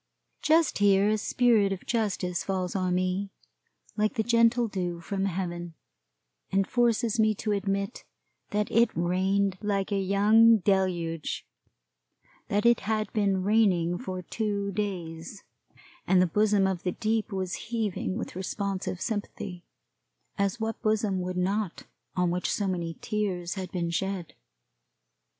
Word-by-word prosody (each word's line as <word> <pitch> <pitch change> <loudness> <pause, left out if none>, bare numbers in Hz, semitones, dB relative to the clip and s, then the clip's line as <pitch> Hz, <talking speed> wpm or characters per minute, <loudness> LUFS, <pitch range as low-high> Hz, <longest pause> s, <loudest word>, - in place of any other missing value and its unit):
Just 320 -4 +3
here 200 0 +4
a 215 - +2
spirit 220 -3 +3
of 195 - -5
justice 195 -6 -1
falls 185 -2 -2
on 185 -2 +1
me, 185 +2 -1 0.7
like 215 +4 0
the 220 - +1
gentle 235 +1 +3
dew 180 -4 -3
from 195 +3 -2
heaven, 175 -3 -3 0.8
and 195 0 +2
forces 235 0 +1
me 215 -1 +4
to 215 +2 -2
admit 200 +2 -2 0.5
that 210 0 -1
it 230 0 +4
rained 185 +2 +1
like 200 -1 -1
a 200 - +1
young 210 +4 +5
deluge; 180 -5 -1 1.0
that 205 +2 0
it 235 -1 +5
had 215 0 -2
been 195 -3 +1
raining 185 -5 +2
for 185 -7 -5
two 200 0 -2
days, 180 -2 -4 0.6
and 190 - +5
the 180 - +5
bosom 205 +2 +2
of 190 -2 -1
the 180 - -2
deep 220 0 -1
was 185 -2 -2 0.2
heaving 215 -4 -2
with 235 - -5
responsive 190 -1 -3
sympathy; 200 -4 -5 0.7
as 200 +3 0
what 225 0 -3
bosom 215 -3 +1
would 180 0 -3
not 195 +1 -1 0.3
on 180 -1 +1
which 180 +1 -1
so 205 - 0
many 170 -3 -2
tears 190 -5 -2
had 185 -3 -6
been 170 -2 -2
shed? 190 -1 -3
195 Hz, 140 wpm, -28 LUFS, 180-215 Hz, 1.0 s, young